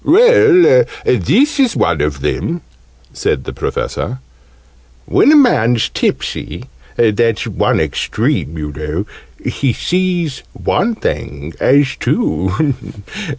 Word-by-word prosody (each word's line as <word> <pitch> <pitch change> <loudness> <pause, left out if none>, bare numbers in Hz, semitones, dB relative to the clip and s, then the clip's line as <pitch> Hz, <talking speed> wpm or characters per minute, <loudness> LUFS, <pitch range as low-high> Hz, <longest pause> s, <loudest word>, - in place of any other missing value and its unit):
"Well, 455 +2 +5 0.2
this 290 +1 +2
is 255 -4 +2
one 85 -3 +1
of 75 -2 -2
them," 165 - -2 0.5
said 65 - -1
the - - -7
Professor. 125 - -3 0.9
"When - - +4
a - - +6
man's 125 - +3
tipsy - - -3 0.3
(that's 115 0 +1
one - - 0
extreme, 80 - -1
you 75 -1 -4
know), 75 +5 -4 0.4
he 135 -4 -1
sees 175 -5 -1
one 230 +4 -1
thing 75 - -4
as 140 0 +3
two. 95 - 0
130 Hz, 110 wpm, -15 LUFS, -, 0.9 s, a